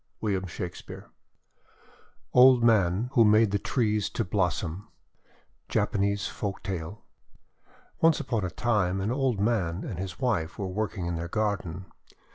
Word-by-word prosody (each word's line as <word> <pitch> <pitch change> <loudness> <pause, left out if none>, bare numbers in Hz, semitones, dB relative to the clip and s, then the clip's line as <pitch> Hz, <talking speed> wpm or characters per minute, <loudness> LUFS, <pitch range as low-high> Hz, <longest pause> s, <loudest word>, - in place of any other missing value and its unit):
WILLIAM 95 -3 -1
SHAKESPEARE 90 0 -8 1.2
OLD 125 -1 +7
MAN 110 0 +3
WHO 120 -5 +5
MADE 110 0 +4
THE 100 - +1
TREES 105 -4 0
TO - - -2
BLOSSOM 90 0 -2 0.8
Japanese 100 0 0
Folktale 95 -2 -5 1.0
ONCE 165 -1 +4
upon 125 -8 -2
a 90 - -1
time, 95 -4 0
an 100 +4 -1
old 130 -4 0
man 100 -5 0
and 90 - -6
his 95 -1 -6
wife 105 -11 -1
were 100 - -3
working 100 -1 -3
in 85 -1 -2
their 85 +1 -4
garden. 95 -3 -2
100 Hz, 130 wpm, -27 LUFS, 90-115 Hz, 1.2 s, OLD